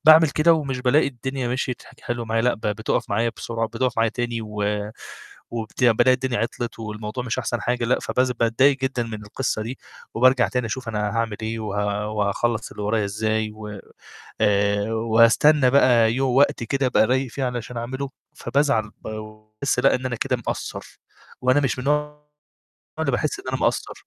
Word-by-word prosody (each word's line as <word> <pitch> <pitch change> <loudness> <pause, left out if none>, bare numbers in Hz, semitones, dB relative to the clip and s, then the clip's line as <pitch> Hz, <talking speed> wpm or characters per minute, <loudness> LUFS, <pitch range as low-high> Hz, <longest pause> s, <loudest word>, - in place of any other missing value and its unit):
باعمل 155 0 +8
كده 155 +4 +4
ومش 140 -5 -2
بالاقي 130 +4 +3
الدنيا 130 0 -4
مشيت 125 0 -2
حل - - -17
حلو 120 -1 -3
معايا، 115 0 0
لأ 125 - +3
ب - - -16
بتقف 105 +1 -1
معايا 115 +3 +1
بسرعة، 115 -1 -2
بتقف 120 +2 -1
معايا 115 0 +2
تاني. 120 0 -3
و 105 -1 -4 0.9
وبت 115 +2 -3
بالاقي 120 +2 +5
الدنيا 130 -1 -2
عطلت 115 0 -3
والموضوع 110 +2 -5
مش 120 0 -2
أحسن 120 -2 -2
حاجة، 120 +2 -1
لأ. 125 - +2
فبز 130 0 0
باتضايق 130 +4 +3
جدًا 130 -2 -1
من 110 -2 -6
القصة 110 +1 -2
دي، 120 +4 -6 0.4
وبارجع 125 +1 +4
تاني 125 -1 -1
أشوف 120 +2 -5
أنا 105 -1 -1
هاعمل 115 -1 -1
إيه، 115 +1 -3
و 110 - -5 0.5
وهاخلص 110 +3 0
اللي - - -7
ورايا 105 +1 +1
إزاي، 110 +1 -1
وآآ، 105 -2 -9 1.1
وأستنى 115 +5 +4
بقى 120 -4 +5
يو 135 +2 +1
وقت 130 -1 +3
كده 135 +4 0
أبقى 125 -3 +4
رايق 130 0 0
فيه 140 - -3
علشان 125 -1 -4
أعمله. 130 +4 -4 0.2
فبازعل 125 -7 0
وباحس 110 +4 -4
لأ 135 +2 +4
إن 130 - -5
أنا 125 -1 -1
كده - - 0
مقصّر، - - -6 0.4
وأنا 130 +3 +4
مش 135 -2 0
من 125 - -5
النوع 150 0 -1 0.8
اللي - - +1
باحس 405 - -1
إن - - -19
أنا - - 0
مقصّر. - - -1
120 Hz, 175 wpm, -23 LUFS, 110-130 Hz, 1.1 s, باعمل